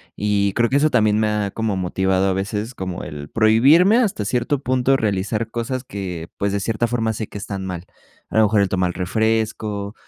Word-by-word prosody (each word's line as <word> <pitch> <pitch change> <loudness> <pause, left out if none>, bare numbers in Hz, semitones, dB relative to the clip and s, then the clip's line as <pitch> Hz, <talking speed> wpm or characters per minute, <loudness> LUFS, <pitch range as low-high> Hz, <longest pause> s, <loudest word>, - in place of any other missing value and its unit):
Y 100 -1 0
creo 120 +2 +2
que 140 - +4
eso 155 +2 +3
también 110 -5 +2
me 110 - +2
ha 105 -1 -1
como 110 -2 -2
motivado 95 +1 0
a 95 - +1
veces 105 +5 -3
como 95 -5 -5
el 75 -1 -8
prohibirme, 135 - +5
hasta 205 - 0
cierto 125 +6 0
punto, 130 +1 +2
realizar 105 +1 -1
cosas 120 +2 -3
que, 90 -8 -6
pues, 100 0 -1
de 100 - 0
cierta 115 +3 -1
forma 115 -1 -1
sé 110 -1 -5
que - - -9
están 100 -1 -5
mal. 90 -1 -6 0.5
A - - -1
lo 110 - +6
mejor 105 -1 +3
el 100 - +2
tomar 90 -1 0
refresco, 105 +1 -1
105 Hz, 205 wpm, -21 LUFS, 95-115 Hz, 0.5 s, lo